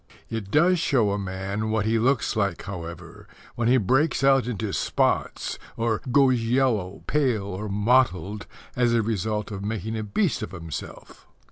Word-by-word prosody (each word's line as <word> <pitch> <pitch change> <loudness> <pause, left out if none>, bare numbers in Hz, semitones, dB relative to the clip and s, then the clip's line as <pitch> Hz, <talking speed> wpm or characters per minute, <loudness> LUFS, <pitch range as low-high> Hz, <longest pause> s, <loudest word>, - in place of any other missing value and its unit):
It 110 -4 -4
does 175 - +4
show 120 -10 +2
a 100 - -1
man 100 +3 -3
what 110 -1 0
he 115 +1 +2
looks 125 +1 +1
like, 100 -5 -1
however, 85 -3 -8 0.3
when 115 -1 -1
he 130 +2 +5
breaks 130 - +2
out 135 -3 +4
into 110 -4 -3
spots - - 0 0.2
or 115 -1 0
goes 130 -2 +4
yellow, 115 -6 0
pale, 130 -8 +1
or 100 +2 -5
mottled 105 -2 +1 0.3
as 120 -1 +2
a 115 - +2
result 105 0 -2
of 100 -1 -5
making 110 +1 -3
a 110 - -2
beast 135 - 0
of 110 - -6
himself. 85 -4 -8
110 Hz, 160 wpm, -25 LUFS, 100-125 Hz, 0.3 s, he